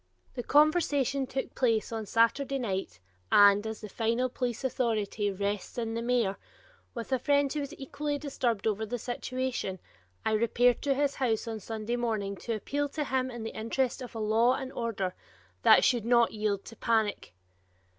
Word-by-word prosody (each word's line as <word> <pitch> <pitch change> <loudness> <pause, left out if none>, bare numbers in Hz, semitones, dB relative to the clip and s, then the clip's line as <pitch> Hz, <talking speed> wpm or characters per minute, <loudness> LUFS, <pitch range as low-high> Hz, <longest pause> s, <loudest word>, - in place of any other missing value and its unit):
The 245 - -3
conversation 285 -2 +3
took 265 +1 -4
place 230 -4 +1
on 220 -2 -4
Saturday 260 +6 +2
night 195 - -3 0.3
and, 205 +1 +6
as 220 -1 -6
the 215 - -6
final 230 +4 0
police 245 -1 -3
authority 220 -5 0
rests 200 +2 -3
in 225 -1 -2
the 230 - -2
mayor, 235 -5 +1 0.6
with 235 +2 -6
a 260 - +2
friend 285 +1 +2
who 300 - -2
was 290 +2 -5
equally 290 +2 -3
disturbed 250 -7 -2
over 220 0 0
the 220 +3 -3
situation, 250 -4 -3 0.5
I - - +2
repaired 235 +2 +3
to 275 -1 +1
his 285 0 +1
house 230 -4 -1
on 225 -1 -4
Sunday 225 +3 -3
morning 215 -4 -1
to 230 +4 -3
appeal 285 +7 -2
to 300 +1 -2
him 260 -2 0
in 240 -2 -6
the 225 - -4
interest 240 +4 -1
of 245 -2 -8
a - - -4
law 225 +4 +3
and 265 -1 -6
order 200 -6 -2 0.5
that - - +7
should 240 -4 +3
not 235 0 +4
yield 210 -2 -1
to 230 - -10
panic. 220 - 0
235 Hz, 175 wpm, -29 LUFS, 215-260 Hz, 0.6 s, that